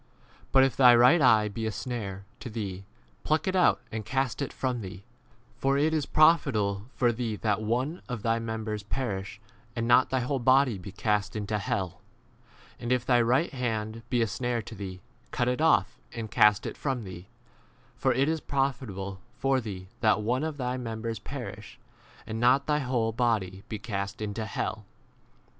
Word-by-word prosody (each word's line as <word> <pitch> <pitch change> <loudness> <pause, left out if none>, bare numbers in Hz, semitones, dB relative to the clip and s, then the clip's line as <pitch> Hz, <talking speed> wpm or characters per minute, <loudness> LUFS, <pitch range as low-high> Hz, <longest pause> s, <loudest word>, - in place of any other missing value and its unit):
But 135 - +6
if 135 - +1
thy 125 -2 +8
right 125 +8 +6
eye 110 -5 +5
be 110 +2 -3
a - - -1
snare 100 -2 -5
v - - -33
to 120 - -7
thee, 100 -4 -5 0.4
pluck 155 +2 +1
it 190 - 0
out 180 - +4
and 110 0 -4
cast 135 +2 -1
it 140 - -2
from 125 -3 -2
thee: 95 0 -8 0.6
for 135 +1 +2
it 155 +3 +2
is 150 -3 0
profitable 110 -11 +3
for 120 -2 +3
thee 115 -2 -3
that 105 0 0
one 125 +10 -1
of 120 -4 -4
thy 115 0 +1
members 110 -2 -3
perish, 100 -2 -4 0.4
and 115 -1 -1
not 120 +1 +5
thy 130 -1 +1
whole 135 +2 -1
body 130 -3 +4
be 95 +2 -8
cast 105 0 0
30 105 - -3
into 105 +1 -1
hell. 95 -1 -1
w - - -23 0.8
And 120 - -4
if 125 -1 +1
thy 120 -2 +4
right 130 +8 +2
hand 115 -3 -2
be 120 -2 +2
a - - 0
snare 120 +2 -2
to 110 - -9
thee, 95 -3 -7 0.3
cut 120 - -1
it 125 +4 0
off 110 -11 +3
and 115 -2 -6
cast 105 0 +4
it - - -5
from 130 -5 -2
thee: 90 -1 -9 0.7
for 130 - +1
it 130 +3 +2
is 160 0 0
profit 135 -3 -1
able 95 0 -6 0.2
for 135 -1 +1
thee 95 -5 -7
that 105 -2 +3
one 125 +6 0
of 155 -2 -3
thy 125 -1 -2
mem 115 -3 -5
bers 115 -2 -3
perish, 105 -4 -8 0.5
and 110 +1 -4
not 125 +4 +4
thy 150 0 +1
whole 125 -4 0
body 110 -5 0
be 110 - -3
cast 100 -2 -4
into 110 +1 -3
hell. 110 +1 -3
115 Hz, 195 wpm, -28 LUFS, 105-130 Hz, 0.8 s, thy